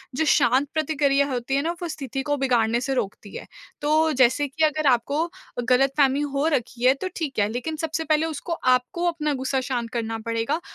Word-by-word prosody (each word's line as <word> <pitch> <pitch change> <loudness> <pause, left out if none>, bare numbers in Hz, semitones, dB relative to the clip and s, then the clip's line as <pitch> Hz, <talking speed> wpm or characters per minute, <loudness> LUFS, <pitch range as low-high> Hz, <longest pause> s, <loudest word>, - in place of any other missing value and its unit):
जो 320 - +1
शांत 265 0 +3
प्रतिक्रिया 285 -3 +1
होती 250 +2 -2
है 280 - +2
ना 330 - -1
वो 345 - -2
स्थिति 270 -4 -4
को 290 -1 -1
बिगाड़ने 240 -3 +1
से 270 +1 -1
रोकती 205 -4 -4
है। - - -7 0.4
तो 310 +2 +3
जैसे 260 +2 +3
कि 315 +4 -2
अगर 310 -1 +2
आपको 285 +7 0 0.4
ग़लतफ़हमी 270 +2 +3
हो 285 0 -1
रखी 250 -4 -1
है 260 - +7
तो 380 - -1
ठीक 295 -8 -3
है, 205 - +3
लेकिन 245 +7 -4
सबसे 320 +1 -3
पहले 310 +1 +2
उसको 325 +2 -4
आपको 255 +4 +1
अपना 305 -3 -1
ग़ुस्सा 265 0 -1
शांत 245 -3 -3
करना 225 -1 -2
पड़ेगा, 230 +7 -1
275 Hz, 195 wpm, -24 LUFS, 250-310 Hz, 0.4 s, है